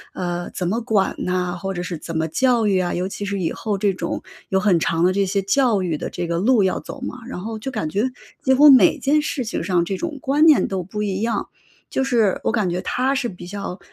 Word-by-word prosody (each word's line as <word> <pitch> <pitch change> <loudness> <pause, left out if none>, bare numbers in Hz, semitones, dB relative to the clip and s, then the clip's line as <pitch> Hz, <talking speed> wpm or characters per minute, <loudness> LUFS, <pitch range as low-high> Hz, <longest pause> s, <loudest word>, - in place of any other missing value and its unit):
呃， 175 -1 -3
怎 180 - -3
么 220 +6 0
管 215 -5 +1
呐， 180 -1 -1
或 195 0 -3
者 175 -2 -4
是 170 -2 -5
怎 165 +1 -5
么 160 0 0
教 240 +6 +2
育 195 -3 +2
啊， 180 -1 -1
尤 180 +1 -1
其 205 +1 -5
是 200 -1 -2
以 170 - -1
后 210 -3 -3
这 195 0 +1
种 170 -2 -4 0.3
有 190 - +2
很 190 -4 +3
长 165 +1 0
的 185 +1 +4
这 200 +1 +2
些 195 +1 0
教 215 -1 +2
育 170 -3 -1
的 - - -4
这 175 - -4
个 170 0 -1
路 225 +2 +4
要 190 - +1
走 - - -9
嘛， 255 -1 -5
然 260 - -6
后 220 +3 -5
就 245 - -5
感 215 -11 -3
觉 210 +10 0 0.3
几 265 0 +3
乎 290 +2 +8
每 250 -9 +6
件 295 +2 +2
事 275 -4 -3
情 220 - -3
上 175 -1 +1
这 195 - -2
种 315 - -4
观 290 +4 +3
念 310 -3 +5
都 190 -2 -3
不 210 +4 -4
一 195 -1 -2
样。 230 0 -1 0.4
就 265 - 0
是 230 -7 +2
我 - - +1
感 210 -6 0
觉 175 - -2
他 265 +2 0
是 265 -2 -1
比 180 -4 -9
较 200 -1 -6
200 Hz, 275 characters per minute, -21 LUFS, 180-240 Hz, 0.4 s, 乎